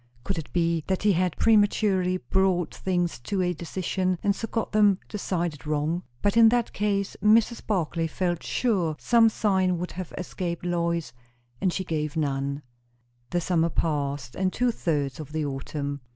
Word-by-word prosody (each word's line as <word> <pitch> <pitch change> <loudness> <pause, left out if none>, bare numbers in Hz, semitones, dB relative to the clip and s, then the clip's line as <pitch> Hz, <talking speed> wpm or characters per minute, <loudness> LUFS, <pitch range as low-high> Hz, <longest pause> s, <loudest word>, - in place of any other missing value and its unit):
Could 145 - -2
it 155 - -8
be 170 -2 +1
that 190 0 -1
he 210 - +5
had 180 -1 0
prematurely 205 -4 +3
brought 185 -2 +1
things 175 -6 -1
to 185 +10 -1
a 180 0 +1
decision, 185 +2 -2
and 200 -1 +2
so 225 - -4
got 225 -1 -2
them 205 -3 +4
decided 175 -7 -3
wrong? 155 +3 0 0.2
But 205 +1 +2
in 230 -1 +8
that 240 0 0
case 200 -1 -1
Mrs. 225 +2 +4
Barclay 170 -5 0
felt 175 0 -1
sure 185 -10 0
some 230 +3 +4
sign 190 -4 +1
would 180 +1 -4
have 180 -1 -6
escaped 175 -1 -4
Lois; 170 -5 -1 0.5
and 185 - +2
she 190 - -2
gave 155 -3 -3
none. 140 -1 -1 0.7
The 175 - 0
summer 170 -1 +1
passed, 140 -5 -1
and 185 -1 0
two 245 +4 +1
thirds 145 - -2
of 150 -1 -8
the 155 -1 -1
autumn. 140 +1 -4
175 Hz, 165 wpm, -26 LUFS, 155-195 Hz, 0.7 s, in